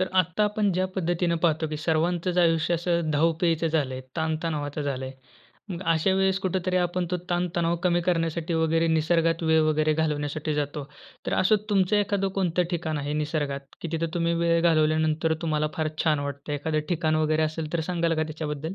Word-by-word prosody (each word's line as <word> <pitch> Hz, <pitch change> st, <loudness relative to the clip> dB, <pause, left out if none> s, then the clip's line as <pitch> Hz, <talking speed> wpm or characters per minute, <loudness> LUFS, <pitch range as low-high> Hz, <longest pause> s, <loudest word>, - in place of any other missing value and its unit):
तर 185 Hz, -, +1 dB
आत्ता 180 Hz, +4 st, +2 dB
आपण 210 Hz, -1 st, +1 dB
ज्या 185 Hz, +1 st, +1 dB
पद्धतीने 175 Hz, -1 st, 0 dB
पाहतो 160 Hz, -1 st, +2 dB
की 155 Hz, -, -4 dB
सर्वांचचं 175 Hz, +2 st, +1 dB
आयुष्य 165 Hz, 0 st, +2 dB
असं 170 Hz, -1 st, 0 dB
धावपळीचं 165 Hz, +2 st, +1 dB
झालं 145 Hz, -5 st, 0 dB
आहे, 130 Hz, -, -5 dB, 0.2 s
ताण-तणावाचं 155 Hz, -2 st, -2 dB
झालं 135 Hz, -2 st, -3 dB
आहे. 130 Hz, -, -6 dB, 0.6 s
मग 180 Hz, -1 st, -5 dB
अशा 165 Hz, +4 st, +2 dB
वेळेस 190 Hz, 0 st, +2 dB
कुठेतरी 185 Hz, -1 st, -1 dB
आपण 175 Hz, 0 st, -1 dB
तो 180 Hz, -, +1 dB
ताण-तणाव 175 Hz, -1 st, 0 dB
कमी 175 Hz, 0 st, +2 dB
करण्यासाठी 165 Hz, -1 st, 0 dB
वगैरे 165 Hz, 0 st, +2 dB
निसर्गात 165 Hz, +1 st, +2 dB
वेळ 160 Hz, 0 st, +4 dB
वगैरे 155 Hz, 0 st, +2 dB
घालवण्यासाठी 150 Hz, -1 st, -1 dB
जातो. 145 Hz, 0 st, -2 dB, 0.4 s
तर -, -, -1 dB
असं 215 Hz, +4 st, +4 dB
तुमचं 195 Hz, 0 st, +3 dB
एखाद 200 Hz, -1 st, +1 dB
कोणतं 180 Hz, -2 st, +1 dB
ठिकाण 160 Hz, -3 st, -2 dB
आहे 145 Hz, 0 st, -3 dB
निसर्गात 145 Hz, -3 st, -4 dB
की 170 Hz, -, -4 dB
तिथं 165 Hz, +1 st, -2 dB
तुम्ही 170 Hz, -1 st, +1 dB
वेळ 170 Hz, 0 st, +3 dB
घालवल्यानंतर 160 Hz, -1 st, +2 dB
तुम्हाला 155 Hz, -2 st, 0 dB
फार 155 Hz, -1 st, 0 dB, 0.2 s
छान 155 Hz, -2 st, +3 dB
वाटतं? 140 Hz, +1 st, -5 dB
एखादं 155 Hz, +2 st, -1 dB
ठिकाण 160 Hz, -3 st, +1 dB
वगैरे 155 Hz, 0 st, +2 dB
असेल 155 Hz, 0 st, -3 dB
तर 170 Hz, -, 0 dB
सांगाल 170 Hz, -2 st, +1 dB
का 155 Hz, -, 0 dB
त्याच्याबद्दल? 155 Hz, +1 st, -4 dB
165 Hz, 180 wpm, -26 LUFS, 155-175 Hz, 0.6 s, वेळ